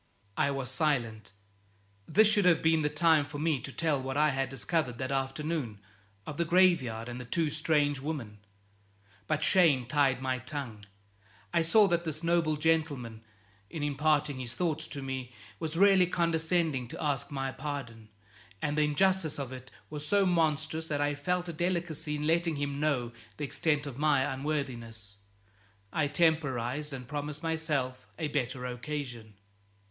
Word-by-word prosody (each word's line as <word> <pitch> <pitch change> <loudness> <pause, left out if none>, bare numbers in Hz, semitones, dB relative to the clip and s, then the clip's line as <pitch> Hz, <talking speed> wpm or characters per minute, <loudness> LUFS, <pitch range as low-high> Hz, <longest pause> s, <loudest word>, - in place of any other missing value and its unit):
I - - +2
was 135 -2 -3
silent. 120 -8 -1 0.8
This 215 +1 +5
should 210 -3 +3
have 170 -3 +4
been 160 0 +4
the 150 - +1
time 155 0 +4
for 145 +1 -8
me 155 -2 +1
to 140 - -7
tell 150 -2 0
what 135 +1 -3
I 150 +1 +4
had 135 -2 -1
discovered 135 -1 -1
that 130 +1 -3
afternoon; 135 -3 -2 0.5
of 150 - -6
the 170 - +2
graveyard 165 -11 +3
and 120 +1 -6
the - - -8
two 160 +4 0
strange 150 -2 +1
women. 130 -8 -5 0.9
But 155 -1 0
shame 155 -9 +5
tied 135 0 +2
my 130 -1 -1
tongue. 120 -5 -6 0.7
I 170 - +4
saw 205 +6 +6
that 170 -2 +1
this 155 -1 -4
noble 165 -2 +2
gentleman, 145 -8 0 0.5
in 155 - -5
imparting 145 -1 +1
his 120 -1 -4
thoughts 155 -2 -1
to 140 -2 -5
me, 130 -2 -5 0.3
was 160 0 -3
really 195 -1 +6
condescending 165 -5 +1
to - - -6
ask 145 -3 -1
my 135 -2 -3
pardon; 130 -6 -6 0.5
and 145 +4 -1
the 150 - +2
injustice 185 +1 +2
of 135 -2 -5
it 130 0 -10 0.2
was 150 -1 -5
so 200 +6 +3
monstrous 160 -2 +1
that 145 -2 -1
I 145 0 +1
felt 180 +5 -1
a 170 - -4
delicacy 165 -3 -1
in 150 0 -3
letting 165 0 +2
him 140 0 -3
know 140 -6 0 0.3
the 145 - -2
extent 150 +1 0
of 140 -2 -7
my 145 -3 +3
unworthiness. 125 -8 -4 0.8
I 150 -2 +1
temporized, 150 -3 +1
and 130 -3 -7
promised 145 +2 -5
myself 155 -6 -1
a 160 -3 -2
better 125 -3 -2
occasion. 125 -4 -5
145 Hz, 165 wpm, -30 LUFS, 130-160 Hz, 0.9 s, saw